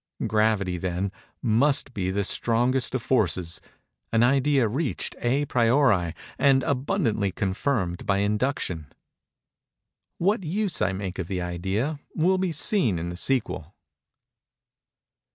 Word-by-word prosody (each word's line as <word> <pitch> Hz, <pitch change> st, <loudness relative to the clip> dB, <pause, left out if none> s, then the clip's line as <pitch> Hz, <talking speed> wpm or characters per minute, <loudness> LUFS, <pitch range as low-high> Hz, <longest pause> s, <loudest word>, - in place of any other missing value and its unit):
Gravity, 105 Hz, -5 st, +1 dB
then, 95 Hz, +2 st, -2 dB, 0.3 s
must 130 Hz, +3 st, +2 dB
be 95 Hz, -4 st, -2 dB
the 100 Hz, +2 st, 0 dB
strongest 120 Hz, +6 st, +1 dB
of 125 Hz, -, -2 dB
forces—an 110 Hz, 0 st, -1 dB
idea 135 Hz, 0 st, +3 dB
reached 125 Hz, -, -2 dB
à 135 Hz, +4 st, 0 dB
priori 115 Hz, -, +3 dB, 0.2 s
and 135 Hz, -1 st, +4 dB
abundantly 125 Hz, -, 0 dB
confirmed 95 Hz, -1 st, -2 dB
by 100 Hz, -, +2 dB
induction. 100 Hz, -, -1 dB, 1.3 s
What 200 Hz, +3 st, +1 dB
use 190 Hz, +2 st, -1 dB
I 90 Hz, -, +2 dB
make 95 Hz, -1 st, -5 dB
of 90 Hz, -, -3 dB
the 90 Hz, -2 st, -2 dB
idea, 95 Hz, -, -2 dB, 0.2 s
will 185 Hz, +4 st, +2 dB
be 185 Hz, -2 st, 0 dB
seen 145 Hz, -, +1 dB
in 85 Hz, +1 st, -3 dB
the 90 Hz, -, -5 dB
sequel. 95 Hz, -, -1 dB
115 Hz, 115 wpm, -25 LUFS, 95-140 Hz, 1.3 s, and